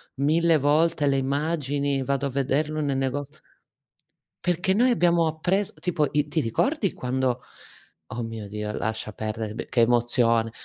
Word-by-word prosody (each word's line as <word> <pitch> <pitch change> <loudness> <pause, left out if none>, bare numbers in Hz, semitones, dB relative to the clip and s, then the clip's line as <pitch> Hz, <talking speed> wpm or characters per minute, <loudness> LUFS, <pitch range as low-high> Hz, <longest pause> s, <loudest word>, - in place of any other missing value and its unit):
mille 160 +4 +3
volte 150 +2 +2
le 135 -1 +2
immagini, 140 -1 -1
vado 140 +1 -1
a 140 - 0
vederlo 145 +3 0
nel 140 -2 0
nego 135 +2 -1 1.2
Perché 180 +2 +1
noi 245 +5 +4
abbiamo 170 -7 +3
appres 180 +6 0
tipo, 160 -4 0
i 150 0 +1
ti 155 +2 -1
ricordi 205 - 0
quando 125 0 -1 0.7
oh 120 +1 -5
mio 115 -2 -6
Dio, 105 +1 -4
lascia 110 -1 -3
perdere, 110 0 -4
be - - -5
che 120 - +2
emozione. 115 -1 +3
140 Hz, 145 wpm, -25 LUFS, 120-160 Hz, 1.2 s, noi